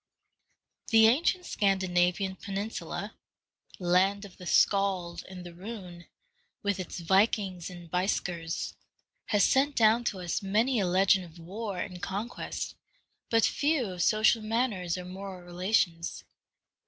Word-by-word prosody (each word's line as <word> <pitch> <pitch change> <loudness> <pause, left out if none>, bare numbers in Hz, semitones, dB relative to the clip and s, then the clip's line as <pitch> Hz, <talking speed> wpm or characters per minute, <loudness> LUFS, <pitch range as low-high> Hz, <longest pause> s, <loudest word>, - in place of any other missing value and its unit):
The 225 -1 +6
ancient 335 +10 +3
Scandinavian 190 -1 +1
peninsula, 200 +2 -5 0.6
land 190 +3 +2
of 195 - -14
the 180 - -9
Scald 190 -4 +2
and 180 -1 -9
the 175 - -9
Rune, 180 -3 -9 0.6
with 200 -1 0
its 185 - -5
Vikings 190 0 +1
and 175 -1 -10
Beisckers, 175 -2 -2 0.5
has 205 -1 +3
sent 275 +1 +3
down 225 +1 +4
to 195 - -1
us 175 +3 -2
many 220 +6 +2
a 190 - +1
legend 190 +1 +3
of 170 0 -15
war 195 +4 -5
and 180 -2 -5
conquest, 210 +5 -4 0.6
but 225 -1 +4
few 285 -8 +1
of 180 -1 -5
social 215 +4 +4
manners 215 -6 -1
or 180 - -6
moral 190 0 -7
relations. 175 -2 0
195 Hz, 130 wpm, -29 LUFS, 180-215 Hz, 0.6 s, The